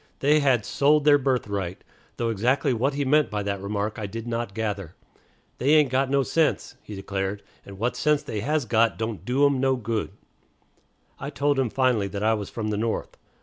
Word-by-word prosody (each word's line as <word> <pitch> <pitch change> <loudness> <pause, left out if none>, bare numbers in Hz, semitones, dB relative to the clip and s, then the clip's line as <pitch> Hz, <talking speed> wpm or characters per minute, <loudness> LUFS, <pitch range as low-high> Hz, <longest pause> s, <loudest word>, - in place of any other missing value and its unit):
They 150 +2 +3
had 130 -6 +2
"sold 145 +1 +2
their 145 -1 +6
birthright," 100 -9 -2 0.3
though 115 -1 -1
exactly 125 +5 +1
what 135 +5 0
he 145 0 -1
meant 150 +2 +3
by 105 -1 -3
that 100 -1 -3
remark 105 +2 -3
I 105 - -3
did 115 +3 -6
not 115 -3 -3
gather. 100 -6 -3 0.6
"They 140 +5 +4
ain't 150 -4 +4
got 130 +1 +1
no 140 0 +2
sense," 160 +3 0
he 105 - -9
declared, 95 +1 -3 0.2
"and 100 -1 -10
what 120 +5 -1
sense 150 +3 +1
they 115 -7 -4
has 150 +5 0
got 115 0 +2
don't 110 -2 -4
do 130 +4 +3
'em 140 -2 +2
no 135 0 +2
good." 115 -3 -2 1.1
I - - -5
told 140 +3 0
him 130 -3 +1
finally 125 -5 +1
that 100 +1 -5
I 110 +1 +3
was 105 -3 -4
from 110 -2 -4
the 105 - -1
North. 110 +1 -2
115 Hz, 200 wpm, -25 LUFS, 105-140 Hz, 1.1 s, their